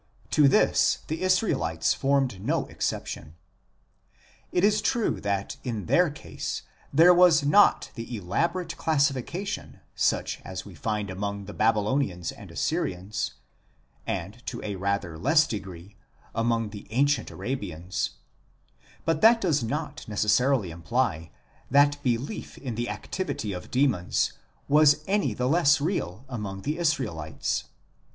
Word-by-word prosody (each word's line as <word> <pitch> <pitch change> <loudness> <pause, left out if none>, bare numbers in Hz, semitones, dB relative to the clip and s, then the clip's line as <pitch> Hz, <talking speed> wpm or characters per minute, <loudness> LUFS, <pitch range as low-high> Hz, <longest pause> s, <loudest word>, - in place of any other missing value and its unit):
To 150 -2 +5
this 135 - +4
the 160 +3 -3
Israelites 140 - +1
formed 135 -8 0
no - - 0
exception. 75 - -4 1.2
It 180 - +1
is 210 +1 +4
true 235 -1 0
that 100 +5 -2
in 115 -7 -3
their 175 - +4
case 85 - -6 0.3
there 165 +5 +7
was 175 -4 +6
not 200 +8 +4
the 115 0 -6
elaborate 170 - -1
classifica 155 +3 0
tion - - -6
such - - 0
as - - -6
we - - -11
find 105 -3 -3
among 100 +1 -4
the 105 - -8
Babylonians 105 - +1
and - - -12
Assyrians, 95 +4 -2 0.7
and, 100 +6 -4
to 120 - -4
a 105 - -3
rather 95 -4 -2
less 155 - +4
degree, 95 - -7 0.4
among 115 -1 0
the 105 -1 -10
ancient 135 +1 +1
Arabians; 95 -8 -4 0.9
but 165 -1 +1
that 230 +1 +7
does 165 - +1
not 150 +7 -4
necessarily 105 0 +2
imply 85 -1 -1 0.4
that 145 +1 +4
belief 130 - -2
in 130 -4 -5
the 120 +2 -3
activity 145 - -4
of 90 - -7
demons 125 -10 +1 0.3
was 150 0 +5
any 195 - +1
the 125 +3 0
less 145 -1 +4
real 135 - -2
among 100 -6 -5
the 150 +4 -2
Israelites. 105 - -1
125 Hz, 130 wpm, -27 LUFS, 100-150 Hz, 1.2 s, there